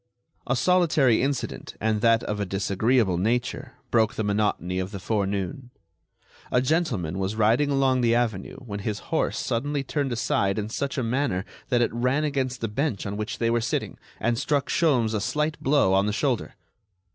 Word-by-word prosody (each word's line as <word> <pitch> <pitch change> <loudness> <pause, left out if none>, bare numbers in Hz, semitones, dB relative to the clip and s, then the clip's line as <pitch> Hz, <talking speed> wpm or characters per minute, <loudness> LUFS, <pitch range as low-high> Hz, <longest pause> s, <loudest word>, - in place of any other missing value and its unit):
A 135 - +2
solitary 150 -5 +3
incident—and 110 -5 -2
that 115 0 +4
of 105 0 -3
a - - 0
disagreeable 100 +1 +1
nature—broke 115 +1 -1
the 110 - -1
monotony 100 -3 0
of 95 0 -2
the 100 - -7
forenoon. 100 +4 -2 0.8
A 125 - +4
gentleman 125 - 0
was 95 +2 -1
riding 115 +7 +3
along 135 -2 +2
the 115 -1 +3
avenue 110 -6 -1
when 100 -3 -5
his 105 +1 -3 0.2
horse - - +1
suddenly 140 +4 -1
turned 140 0 -2
aside 100 -4 0
in 105 0 -2
such 140 +5 -3
a 130 - 0
manner 115 -6 0 0.2
that 120 -2 +3
it - - -1
ran 125 +5 +1
against 135 -4 -1
the 115 - 0
bench 120 0 -2
on 100 0 -3
which 105 +4 -4
they 115 -1 +1
were 120 0 +2
sitting, 115 - -2 0.2
and 120 0 0
struck 140 0 0
Sholmes 125 -9 +2
a 105 - 0
slight 150 +6 -1
blow 135 -9 +3
on 95 +1 +3
the 105 - 0
shoulder. 125 +1 -1
115 Hz, 175 wpm, -25 LUFS, 105-135 Hz, 0.8 s, that